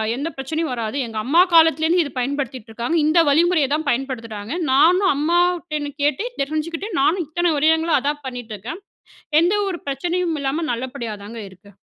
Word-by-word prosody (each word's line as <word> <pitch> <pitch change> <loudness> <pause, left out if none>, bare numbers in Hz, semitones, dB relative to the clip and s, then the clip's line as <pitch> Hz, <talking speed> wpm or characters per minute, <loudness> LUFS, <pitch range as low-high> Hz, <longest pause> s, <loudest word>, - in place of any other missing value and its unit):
எந்த 285 +6 -3
பிரச்சனையும் 310 +2 -3
வராது. 230 +2 -3
எங்க 225 -1 -7
அம்மா 320 +7 +5
காலத்திலேருந்து 325 +1 +5
இத 285 - -7
பயன்படுத்திட்டு 260 -3 -3
இருக்காங்க. 240 +9 -1
இந்த 320 +2 +4
வழிமுறைய 320 -1 +3
தான் 310 -1 -4
பயன்படுத்துறாங்க. 230 -4 -3 0.2
நானும் 360 +8 +4
அம்மாட்டருந்து 330 -1 0
கேட்டு 295 - +1 0.2
தெரிஞ்சுகிட்டு 310 +7 -3
நானும் 340 +5 +2
இத்தன 345 +2 0
வருடங்களா 320 +2 +3
அதான் 290 +1 -2
பண்ணிகிட்டுருக்கேன். 245 - -7 0.6
எந்த 350 +4 +2
ஒரு 360 -3 -4
பிரச்சனையும் 340 +4 -1
இல்லாம, 280 +4 -1
நல்லபடியா 240 -2 -5
தாங்க 225 +2 -8
இருக்கு. 190 +2 -18
295 Hz, 145 wpm, -21 LUFS, 255-335 Hz, 0.6 s, அம்மா